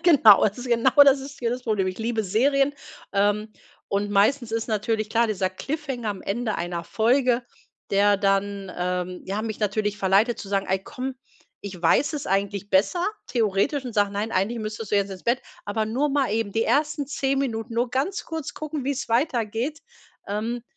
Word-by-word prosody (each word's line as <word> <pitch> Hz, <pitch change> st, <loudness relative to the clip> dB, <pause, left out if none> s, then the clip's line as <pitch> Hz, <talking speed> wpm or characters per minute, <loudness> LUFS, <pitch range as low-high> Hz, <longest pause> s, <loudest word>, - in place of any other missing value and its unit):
Genau, 260 Hz, -, +7 dB
also 210 Hz, +4 st, +1 dB
genau 235 Hz, +2 st, +3 dB
das 275 Hz, -1 st, +5 dB
ist 275 Hz, +1 st, -9 dB
hier 235 Hz, -3 st, -1 dB
das 250 Hz, +1 st, -3 dB
Problem. 210 Hz, -5 st, 0 dB
Ich 185 Hz, +2 st, -4 dB
liebe 225 Hz, -1 st, -1 dB
Serien, 275 Hz, +8 st, +2 dB, 0.4 s
ähm, 205 Hz, +2 st, +1 dB, 0.4 s
und 205 Hz, +1 st, -1 dB
meistens 220 Hz, +5 st, +2 dB
ist 225 Hz, 0 st, -2 dB
natürlich 215 Hz, 0 st, -1 dB
klar 235 Hz, 0 st, +3 dB
dieser 195 Hz, -4 st, -1 dB
Cliffhanger 265 Hz, +2 st, -4 dB
am 200 Hz, -, -4 dB
Ende 220 Hz, +1 st, -2 dB
einer 170 Hz, 0 st, -3 dB
Folge, 245 Hz, +2 st, +2 dB, 0.5 s
der 200 Hz, +1 st, +4 dB
dann, 195 Hz, -1 st, 0 dB
ähm, 180 Hz, 0 st, -2 dB
ja, 200 Hz, +3 st, -2 dB
mich 220 Hz, -1 st, -5 dB
natürlich 210 Hz, 0 st, -1 dB
verleitet 200 Hz, +5 st, +3 dB
zu 195 Hz, -, -7 dB
sagen: 195 Hz, -1 st, 0 dB
„Ey, 190 Hz, -, +2 dB
komm, 260 Hz, +5 st, -5 dB, 0.5 s
ich 190 Hz, -3 st, -8 dB
weiß 225 Hz, -, +3 dB
es 290 Hz, -, -4 dB
eigentlich 200 Hz, +1 st, -1 dB
besser 210 Hz, -, +2 dB, 0.2 s
theoretisch“ 230 Hz, +5 st, 0 dB
und 245 Hz, -, -5 dB
sage: 205 Hz, -2 st, +2 dB
„Nein, 210 Hz, +3 st, -3 dB
eigentlich 205 Hz, +6 st, 0 dB
müsstest 215 Hz, 0 st, -5 dB
du 205 Hz, -, +3 dB
jetzt 200 Hz, 0 st, +1 dB
ins 185 Hz, -2 st, -8 dB
Bett, 240 Hz, +2 st, +1 dB, 0.2 s
aber 215 Hz, +2 st, -1 dB
nur 265 Hz, +7 st, 0 dB
mal 275 Hz, -5 st, +1 dB
eben 220 Hz, -2 st, -1 dB
die 225 Hz, +3 st, 0 dB
ersten 295 Hz, -1 st, +1 dB
10 275 Hz, -1 st, -1 dB
Minuten, 230 Hz, -3 st, -3 dB
nur 240 Hz, +2 st, +1 dB
ganz 280 Hz, -, -1 dB
kurz 320 Hz, -3 st, -5 dB
gucken, 305 Hz, -3 st, -5 dB
wie 280 Hz, -, 0 dB
es 280 Hz, -1 st, -5 dB
weitergeht“. 240 Hz, +2 st, 0 dB, 0.5 s
Ähm, 225 Hz, +4 st, -3 dB
220 Hz, 190 wpm, -24 LUFS, 200-260 Hz, 0.5 s, Genau